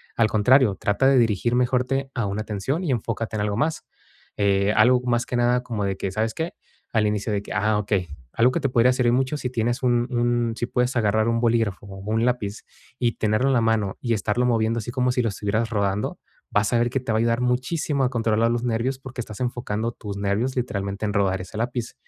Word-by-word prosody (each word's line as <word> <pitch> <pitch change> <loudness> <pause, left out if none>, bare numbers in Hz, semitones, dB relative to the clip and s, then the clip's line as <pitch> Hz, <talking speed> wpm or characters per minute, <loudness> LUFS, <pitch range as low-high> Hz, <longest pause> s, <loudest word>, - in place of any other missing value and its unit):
Al 115 - +3
contrario, 110 0 +4
trata 105 +6 +2
de 135 -1 +5
dirigir 115 +1 +2
mejor 125 0 +2
te 135 +1 -2
a 115 - 0
una 100 +2 -3
atención 110 - -2
y 160 - 0
enfócate 115 -2 -2
en - - -1
algo 105 0 -1
más. 155 +4 -1 0.5
Eh, 100 0 +2
algo 125 +3 +5
más 120 -1 +1
que 125 - -4
nada 120 +1 +2
como 110 -5 -3
de 95 -1 -2
que, 95 -1 -3
¿sabes 110 +2 -1
qué?, 160 +5 -3 0.4
al 110 -2 +3
inicio 105 +1 -1
de 100 - 0
que - - -10
ah, 105 0 +1
okey. 100 -3 -1 0.3
Algo 120 +2 +4
que 170 - -1
te 140 - +1
podría 125 +1 +4
servir 125 -2 +2
mucho 130 +3 +1
si 125 - -3
tienes 120 +2 -1
un 120 -1 +2
un 120 -1 +1
si 120 - -1
puedes 125 +1 0
agarrar 110 -1 +2
un 115 0 +1
bolígrafo, 115 -5 +1
o 95 - -9
un 115 +1 +2
lápiz 115 -4 -1 0.4
y 120 -2 +1
tenerlo 110 +5 +1
en - - +3
la 120 - +3
mano 110 -3 0
y 120 -2 0
estarlo 110 +3 0
moviendo 115 -1 +1
así 115 - -5
como 125 -1 +1
si 125 - +1
lo 115 - 0
estuvieras 105 +3 -1
rodando, 100 -1 -1 0.3
vas 105 +3 +1
a 120 - +4
ver 120 - +2
que 130 +2 -1
te 120 -2 -4
va 110 - +2
a - - +2
ayudar 115 +1 +1
muchísimo 135 +3 0
a 125 - +2
controlar 115 -2 +1
los 120 0 -1
nervios 120 +2 -1
porque 130 -1 -7
estás 110 -3 -9
enfocando 120 -2 -2
tus 100 -3 -7
nervios 100 +7 -1
literalmente 100 -4 -2
en 105 - -1
rodar 95 -2 +1
ese 95 +3 -9
lápiz. 120 0 -3
115 Hz, 235 wpm, -24 LUFS, 105-125 Hz, 0.5 s, de